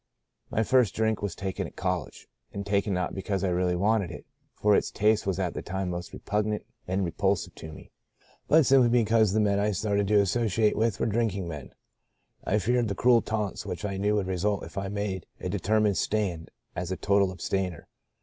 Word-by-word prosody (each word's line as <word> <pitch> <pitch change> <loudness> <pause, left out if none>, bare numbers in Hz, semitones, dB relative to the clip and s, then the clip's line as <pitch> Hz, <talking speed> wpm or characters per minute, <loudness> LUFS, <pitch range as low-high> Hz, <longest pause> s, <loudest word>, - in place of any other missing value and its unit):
My 110 - +1
first 125 -1 +3
drink 110 -1 0
was 100 -4 -3
taken 95 -1 -3
at - - -15
college, 90 -5 -3 0.2
and 100 0 -5
taken 100 0 +1
not 90 -2 -1
because 95 0 -2
I 95 - +1
really 90 0 +1
wanted 100 0 +1
it - - -9 0.3
(for 105 -1 +3
its - - +1
taste 105 -1 +2
was 95 -2 0
at 90 -3 -1
that - - -7
time 95 0 -2
most 90 0 -5
repugnant 105 0 -2 0.2
and 95 +1 0
repulsive 95 +2 -1
to 80 - -9
me), - - -13 0.6
but 160 -1 +5
simply 130 -3 +5
because 115 -3 +3
the 110 - +1
men 100 -1 +2
I 105 +1 +2
started 100 0 0
to 105 0 +4
associate 105 +1 +2
with 110 -2 0
were - - +1
drinking 105 -5 0
men. 75 -5 -8 0.7
"I - - +1
feared 120 +4 +1
the 100 - -2
cruel 120 +2 +4
taunts 105 -3 -3
which 90 - -5
I 100 -1 -3
knew 105 +2 +1
would 100 -2 0
result 95 +2 -1
if - - -10
I 95 -1 -2
made 100 -2 -3
a 90 - -4
determined 105 +1 +1
stand 95 -7 -1 0.3
as 90 0 -3
a 95 - -2
total 100 -1 +2
abstainer. 90 0 -3
100 Hz, 200 wpm, -27 LUFS, 95-110 Hz, 0.7 s, but